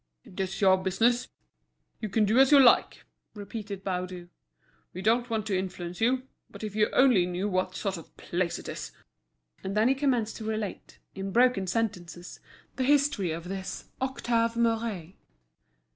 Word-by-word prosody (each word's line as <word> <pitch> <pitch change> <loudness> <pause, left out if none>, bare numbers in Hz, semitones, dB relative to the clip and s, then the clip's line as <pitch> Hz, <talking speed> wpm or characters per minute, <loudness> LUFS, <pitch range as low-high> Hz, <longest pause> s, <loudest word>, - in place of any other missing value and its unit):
"It's 190 0 -5
your 190 -1 +6
business, 230 +7 +1 0.7
you 215 - -4
can 210 +2 +2
do 220 +5 +3
as 270 +1 +6
you 285 - +8
like," 255 -3 +4 0.3
repeated 205 -1 -7
Baudu. 180 -2 -4 0.7
"We 185 - -5
don't 235 +3 +2
want 220 -2 -1
to 205 -3 -1
influence 180 -1 -4
you. 255 +3 +2 0.3
But - - -11
if 210 -1 -5
you 215 -1 +3
only 245 -10 +4
knew 180 +3 -2
what 185 -2 -1
sort 195 -3 -2
of 165 - -14
place 175 0 -2
it - - -10
is—" - - -6 0.7
And 195 +2 -3
he 265 - +4
commenced 255 -6 0
to 225 - -7
relate, 215 -2 -5 0.2
in 195 0 -5
broken 240 -4 +3
sentences, 180 -5 -3 0.4
the 260 - 0
history 280 - +2
of 165 +2 -5
this 190 0 -6
Octave 235 -3 0
Mouret. 225 -7 -1
210 Hz, 160 wpm, -28 LUFS, 185-235 Hz, 0.7 s, you